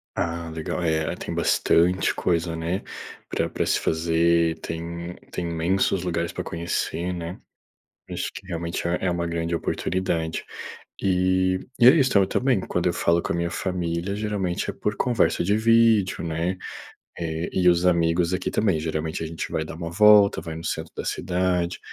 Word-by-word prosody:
Ah 85 -1 -2
legal, 80 +2 -4
é, 80 0 0
tem 85 - -6
bastante 85 +2 +2
coisa 85 -1 0
né, 85 +4 -2 0.5
pra - - -1
pra - - -2
se - - +2
fazer, 85 0 +2
tem 85 +1 -5 0.2
tem 85 - -3
imensos 85 +3 +1
lugares 85 -1 -1
para - - -5
conhecer 85 +1 -2
né? 85 0 -6 0.7
Acho - - -3
que - - -9
realmente 85 -1 -3
é 85 +1 +1
é 90 - +2
uma 85 0 -1
grande 85 0 -2
oportunidade. 85 -1 -2 0.6
E 95 0 +2 0.2
e 120 - +7
é - - +11
isso 135 -5 +3 0.2
também, 125 -1 +1
quando 90 -1 -1
eu 85 - +1
falo 85 0 +2
com - - -2
a - - -1
minha 85 0 -1
família 90 0 -2
geralmente 105 -4 -2
é - - -3
por 105 - -2
conversa 120 -11 +2
de 100 +4 +2
vídeo 115 -4 +3
né, 85 +3 -2 0.6
eh, 80 0 -3
e 90 -1 +4
os 85 0 +2
amigos 85 0 +2
aqui 90 - -2
também 100 -6 +2
geralmente 80 0 -3
a - - -3
gente 80 0 -5
vai 80 - -1
dar 80 - -8
uma 85 0 -5
volta, 105 +1 +6
vai 80 -1 -6
no 80 - -7
centro - - -3
da - - -4
cidade, 90 -1 -1
85 Hz, 170 wpm, -24 LUFS, 85-95 Hz, 0.7 s, é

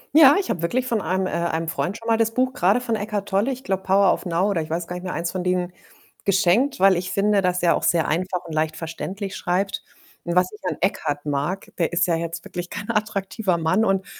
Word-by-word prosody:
Ja, 295 -2 +9
ich 385 - -2
habe 170 - -3
wirklich 245 +10 0
von 230 -4 0
einem 190 0 0
äh, - - -3
einem 165 0 -1
Freund 180 +4 -2
schon 230 - -14
mal 225 -1 +3
das 225 0 +1
Buch 255 0 +1
grade 200 +6 +2
von 230 -2 -1
Eckhart 205 -1 -3
Tolle, 205 +7 +1
ich 260 0 -6
glaube, 190 -7 -1
„Power 195 0 +4
of - - -5
Now“ 175 +3 +1
oder 170 - 0
ich 155 - -7
weiß 165 +2 -2
gar 175 - -6
nicht 180 - -6
mehr 185 - -4
1 170 0 -2
von 185 -1 -3
denen 180 -1 0 0.5
geschenkt, 200 +7 +2
weil 190 -1 +5
ich 180 +1 -3
finde, 205 0 +2
dass 180 -1 0
er 170 - +4
auch - - -2
sehr 165 -2 +2
einfach 180 +2 -1
und 165 - -7
leicht 155 0 0
verständlich 190 +4 -5
schreibt 190 +2 -1 0.4
und 170 0 -3
was 180 0 +3
ich 210 - -13
an 155 - -4
Eckhart 150 -6 -1
mag, 150 +6 -2
der 170 0 0
ist 175 0 +3
ja 170 - +1
jetzt 165 0 -4
wirklich 175 -1 -6
kein 205 - -4
attraktiver 205 -2 -1
Mann, 170 +6 +2
und 195 -3 +1
185 Hz, 250 wpm, -23 LUFS, 170-205 Hz, 0.5 s, Ja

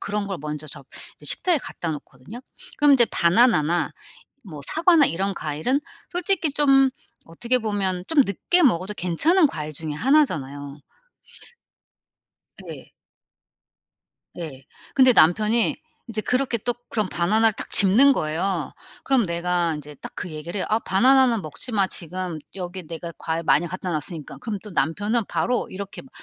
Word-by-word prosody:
그런 205 0 -3
걸 195 -3 -4
먼저 150 0 -6
저 145 - -10 0.3
이제 - - -12
식탁에 355 -4 +2
갖다 170 - -6
놓거든요. 150 - -9 0.4
그럼 290 -1 +5
인제 245 -3 +6
바나나나 175 -3 +3 0.5
뭐 155 -7 -9
사과나 325 -2 +4
이런 195 +3 -2
과일은 155 - -1 0.3
솔직히 355 -4 0
좀 270 -2 +4 0.4
어떻게 235 +10 -1
보면 195 -5 -2
좀 310 -3 +5
늦게 350 - +1
먹어도 200 - +2
괜찮은 300 - +2
과일 155 - -6
중에 155 +1 -4
1 275 - +4
잖아요. 145 - -7 1.9
예. - - -10 1.4
예. 145 -6 -8 0.3
근데 260 -2 +7
남편이 215 +7 +3 0.4
이제 215 -1 -2
그렇게 250 0 0
또 245 +3 -2
그럼 215 -4 -1
바나나를 215 +6 +2
딱 - - -5
집는 235 +9 +6
거예요. 165 - -2 0.3
그럼 260 -6 +2
내가 170 -1 -1
인제 150 0 -9
딱 - - -10
그 180 - -6
얘기를 155 +5 -6
해요. - - -2
"아 215 - +3
바나나는 245 +2 +3
먹지 155 - -5
마. 200 -3 +2
지금 180 -1 -4 0.2
여기 180 -2 -7
내가 170 +1 -7
과일 165 +1 -3
많이 150 +2 +2
갖다 185 +1 -5
놨으니까." 155 0 -4
그럼 215 -4 -5
또 210 - -9
남편은 205 +6 0
바로 245 0 -1
이렇게 195 +1 -7
막 265 - -17
195 Hz, 305 characters per minute, -23 LUFS, 165-245 Hz, 1.9 s, 근데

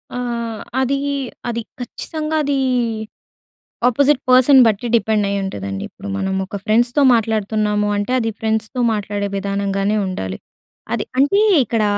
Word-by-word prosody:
ఆ! - - -3 0.6
అదీ 270 +1 +1 0.5
అది 235 0 -2 0.2
ఖచ్చితంగా 310 +5 -4
అదీ 285 -1 0 1.3
ఆపోజిట్ 280 +3 +3
పర్సన్ 255 +2 +7
బట్టి 220 +2 0
డిపెండ్ 220 -2 +1
అయ్యి 200 0 -1
ఉంటుందండి. 100 - -4
ఇప్పుడు 200 - -11
మనం 190 -1 -1
ఒక 195 - -8
ఫ్రెండ్స్‌తో 240 +6 +2
మాట్లాడుతున్నాము 215 -2 0
అంటే, 205 +4 -2
అది 225 -2 -1
ఫ్రెండ్స్‌తో 220 +3 -1
మాట్లాడే 205 -1 -2
విధానంగానే 200 +1 -1
ఉండాలి. 95 - -4 0.6
అది - - -1
అంటే 285 +10 +4 0.2
ఇక్కడ 225 -1 0
220 Hz, 125 wpm, -19 LUFS, 200-250 Hz, 1.3 s, పర్సన్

